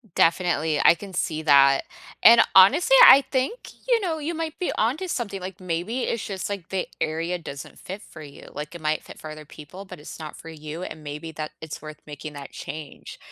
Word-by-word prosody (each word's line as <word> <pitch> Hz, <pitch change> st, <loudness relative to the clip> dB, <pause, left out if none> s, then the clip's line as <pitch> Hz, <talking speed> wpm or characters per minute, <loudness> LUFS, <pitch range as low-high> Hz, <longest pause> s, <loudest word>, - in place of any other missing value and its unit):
Definitely. 165 Hz, -3 st, +2 dB
I -, -, +8 dB
can 200 Hz, +2 st, -10 dB
see 160 Hz, -3 st, -2 dB
that. 140 Hz, -2 st, +5 dB, 0.4 s
And, 230 Hz, +1 st, +8 dB
honestly, 295 Hz, -, +7 dB
I 275 Hz, -, +9 dB
think, 260 Hz, -, 0 dB, 0.3 s
you 480 Hz, -2 st, +3 dB
know, 330 Hz, -5 st, -2 dB
you 315 Hz, +3 st, -3 dB
might 325 Hz, -1 st, -4 dB
be 360 Hz, -, -1 dB
onto 270 Hz, -, 0 dB
something. 205 Hz, -, -4 dB
Like, 185 Hz, +2 st, -7 dB
maybe 185 Hz, +7 st, -3 dB
it's 230 Hz, -, -2 dB
just, 195 Hz, 0 st, -5 dB
like, 195 Hz, -4 st, -6 dB
the 190 Hz, -1 st, -2 dB
area 165 Hz, +3 st, -2 dB
doesn't 140 Hz, -4 st, -9 dB
fit 195 Hz, +3 st, -8 dB
for 155 Hz, -, -13 dB
you. 145 Hz, -2 st, -12 dB
Like, 150 Hz, +3 st, -7 dB
it 170 Hz, -, -9 dB
might 155 Hz, 0 st, 0 dB
fit -, -, -12 dB
for 155 Hz, -, -8 dB
other 155 Hz, 0 st, -10 dB
people, 155 Hz, +7 st, -11 dB
but 190 Hz, -, -11 dB
it's 150 Hz, -, -10 dB
not 155 Hz, -1 st, -8 dB
for 165 Hz, -, -11 dB
you, 155 Hz, +2 st, -8 dB
and 155 Hz, -4 st, -8 dB
maybe 150 Hz, +2 st, -7 dB
that 155 Hz, 0 st, -5 dB
it's 160 Hz, -2 st, -7 dB
worth 155 Hz, -1 st, -9 dB
making 150 Hz, 0 st, -8 dB
that 140 Hz, -1 st, -9 dB
change. 155 Hz, -2 st, -9 dB
170 Hz, 210 wpm, -24 LUFS, 155-210 Hz, 0.4 s, I